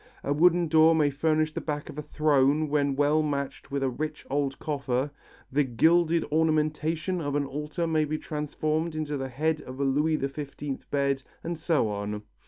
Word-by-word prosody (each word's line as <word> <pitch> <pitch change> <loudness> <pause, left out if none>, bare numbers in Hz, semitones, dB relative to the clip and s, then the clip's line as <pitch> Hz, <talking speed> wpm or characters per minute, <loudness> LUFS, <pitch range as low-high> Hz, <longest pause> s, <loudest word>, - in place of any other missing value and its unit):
A 140 - 0
wooden 175 +2 +4
door 160 +1 +6
may 150 -2 +3
furnish 155 +2 +1
the - - -3
back 150 -1 -4
of - - -8
a - - -2
throne 150 0 +2
when 140 -2 +1
well 145 +2 +3
matched 140 -2 -3
with 140 -1 -2
a 135 - +2
rich 150 +4 -5
old 140 -1 0
coffer; 140 -2 -2 0.4
the 145 +3 +3
gilded 165 +7 +3
ornamentation 155 +2 +1
of 145 -2 -2
an 145 -1 +1
altar 150 +5 -3
may 160 -2 +2
be 155 +1 -2
transformed 155 +1 -2
into 155 -1 -2
the 135 -1 -3
head 155 +5 0
of 130 +1 -9
a - - +1
Louis 150 +3 +2
XV 140 0 -5
bed, 140 -1 +1 0.2
and 170 +1 -3
so 160 -6 +1
on. 105 +1 -4
150 Hz, 185 wpm, -27 LUFS, 140-155 Hz, 0.4 s, door